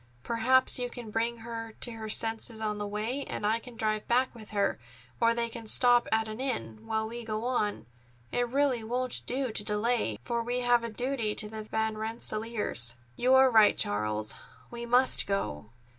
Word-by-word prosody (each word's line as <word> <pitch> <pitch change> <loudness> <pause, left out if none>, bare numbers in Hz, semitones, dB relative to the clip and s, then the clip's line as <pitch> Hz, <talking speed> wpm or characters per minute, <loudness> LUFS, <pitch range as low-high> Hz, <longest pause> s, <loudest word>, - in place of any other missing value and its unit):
Perhaps 255 +3 +3
you 245 0 -1
can 240 -3 -8
bring 230 +1 -1
her 225 -1 -6
to 240 - 0
her 220 -1 -7
senses 225 +1 +1
on 210 -1 -2
the 205 - -3
way, 220 +7 -2
and - - -4
I 220 +2 +2
can 245 0 -11
drive 215 -1 -1
back 255 +2 +2
with 220 -3 -12
her, 200 -2 0 0.4
or 230 0 +3
they 235 0 0
can 230 -1 -8
stop 245 +1 +5
at 220 0 +2
an 215 +2 -7
inn, 115 - -3
while 220 0 -1
we 235 +1 -7
go 220 0 -3
on. 230 -5 -1 0.5
It 245 0 0
really 265 -3 +1
won't 250 +2 -2
do 260 -1 -1
to 210 - -2
delay, 210 - 0
for 235 - -1
we 245 +2 -2
have 245 -1 +3
a 230 - -3
duty 240 -2 -2
to 210 - -1
the 220 0 -7
Van 220 0 -2
Rensselaers." 220 - 0 0.2
"You 255 +2 +3
are 265 0 +6
right, 220 -2 +6
Charles. 105 +1 -1 0.4
We 235 0 -6
must 250 +2 +5
go. 110 - -3
225 Hz, 190 wpm, -29 LUFS, 215-245 Hz, 0.5 s, are